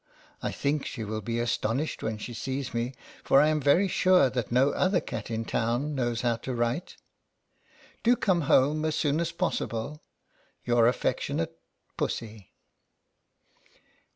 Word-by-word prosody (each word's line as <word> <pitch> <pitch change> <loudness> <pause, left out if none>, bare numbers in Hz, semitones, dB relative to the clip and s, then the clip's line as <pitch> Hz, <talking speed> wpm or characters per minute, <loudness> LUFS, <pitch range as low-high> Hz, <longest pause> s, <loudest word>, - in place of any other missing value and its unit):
I - - -2
think 145 +1 -1
she 115 - -5
will 110 +1 -4
be 115 +3 -3
astonished 120 +4 -1
when 110 -1 -2
she 120 +3 -7
sees 130 +3 -4
me, 120 +3 -2 0.3
for 135 - +5
I 150 +2 +5
am 155 -1 +1
very 155 +8 +4
sure 180 -7 +4
that 125 -4 -3
no 130 +4 +4
other 185 0 +2
cat 110 -8 -6
in 115 0 -2
town 120 +8 -1
knows 120 -4 -1
how 120 -2 +1
to 125 +2 -5
write. 120 +8 -2 1.0
Do 240 +2 +4
come 185 -6 +1
home 150 +2 +4
as 155 -1 0
soon 150 0 +1
as 170 0 -1
possible. 150 -5 -2 0.6
Your 120 -1 +4
affectionate 145 +6 -1 0.4
PUSSY. 110 -4 -4
130 Hz, 150 wpm, -28 LUFS, 115-155 Hz, 1.0 s, for